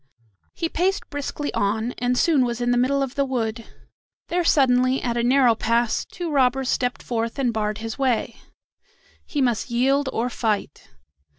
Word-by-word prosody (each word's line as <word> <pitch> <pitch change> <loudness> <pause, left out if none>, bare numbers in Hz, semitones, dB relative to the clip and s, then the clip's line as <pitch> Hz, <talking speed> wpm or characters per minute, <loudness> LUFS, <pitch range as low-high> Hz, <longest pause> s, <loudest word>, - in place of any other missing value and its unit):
He 330 - -1
paced 385 +7 -1
briskly 290 0 -4
on, 220 +4 0
and 245 +1 0
soon 305 -4 +3
was 240 -1 -2
in 245 0 0
the 245 - +2
middle 275 +2 +2
of 270 -1 -4
the 280 - +1
wood. 230 -4 -3 0.6
There 350 0 +1
suddenly, 255 -4 +3
at 235 -1 -2
a 235 - +1
narrow 250 0 +4
pass, 230 +1 0
two 345 -3 -6
robbers 265 -1 +2
stepped 250 -1 -1
forth 230 0 -3
and 250 -4 0
barred 210 -1 -1
his 225 +3 -6
way. 245 -3 0 0.9
He 290 -3 0
must 245 -1 0
yield 265 +3 +1
or 235 +2 -1
fight. 210 - -2
250 Hz, 170 wpm, -23 LUFS, 230-275 Hz, 0.9 s, narrow